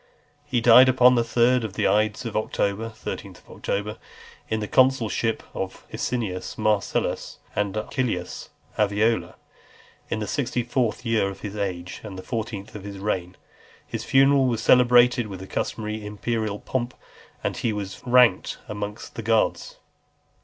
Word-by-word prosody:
He 120 - 0
died 125 +2 +8
upon 125 0 +6
the 120 -1 +3
third 120 +2 +3
of 110 -4 -4
the - - +1
ides 110 +4 +1
of 115 - -5
October 110 0 -1
[13th 110 - -7
October], 105 +2 -4 0.5
in 110 - 0
the 105 - -3
consulship 120 -3 +2
of 95 0 -5
Asinius 105 -7 -3
Marcellus 105 -2 0 0.2
and 105 0 -1
Acilius 110 -5 -3 0.3
Aviola, 105 +2 +1 0.7
in - - -1
the 110 - -3
sixty 125 -1 -1
fourth 120 -1 -1
year 110 -4 +2
of 100 - -9
his 105 -1 -6
age, 90 -3 -4
and 100 -3 -8
the 95 - -7
fourteenth 110 -3 -5
of 105 - -8
his 100 -1 -7
reign. 95 -3 -3 0.5
His - - -5
funeral 135 0 +4
was 115 -3 -1
celebrated 125 -1 +5
with 95 -3 -7
the 95 - -8
customary 110 +2 -3
imperial 105 0 -2
pomp, 120 +2 -3 0.5
and - - -1
he 115 - -1
was 100 -3 -5
ranked 125 -6 +4
amongst 105 +1 -6
the - - -5
gods. 110 0 0
110 Hz, 150 wpm, -24 LUFS, 100-120 Hz, 0.7 s, died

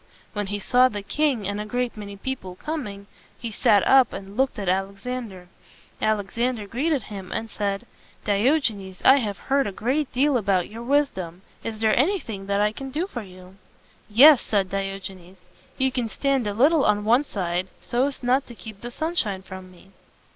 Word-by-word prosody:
When 205 -2 -2
he 205 +1 -2
saw 250 +5 +4
the 205 -4 -5
king 255 -2 0
and 205 +1 -2
a - - -5
great 245 +1 -2
many 200 -2 -8
people 195 -5 -5
coming, 210 - -5 0.3
he 230 -1 -5
sat 205 -1 +3
up 265 -3 +6
and 195 +1 -8
looked 265 +3 +1
at 200 -3 -4
Alexander. 195 +1 -3 0.5
Alexander 215 +2 0
greeted 270 +5 0
him 195 -3 -8
and 225 0 -3
said, 200 -1 -2 0.4
"Diogenes, 205 - +1
I 265 - +8
have 210 -7 -2
heard 275 -2 +1
a - - -3
great 255 +8 -1
deal 275 +1 +3
about 195 -5 +1
your 225 +2 -8
wisdom. 215 - 0 0.2
Is 220 -1 -5
there 220 -1 +4
anything 245 - 0
that 200 0 +1
I 210 0 +3
can 270 +5 -7
do 305 +7 -1
for 255 -11 -6
you?" 185 -1 -14 0.5
"Yes," 270 +6 +8
said 195 -3 0
Diogenes. 190 -2 -6 0.3
"You 265 0 +2
can 245 -3 -1
stand 270 -2 0
a 205 - -2
little 290 +6 +4
on 210 0 +2
one 240 +6 +4
side, 180 -7 -2
so 250 +3 0
as 280 -2 -7
not 255 +3 +2
to 240 - -10
keep 215 -3 -10
the 240 - -5
sunshine 240 - -2
from 185 -1 -9
me." 185 +1 -19
215 Hz, 185 wpm, -24 LUFS, 195-260 Hz, 0.5 s, I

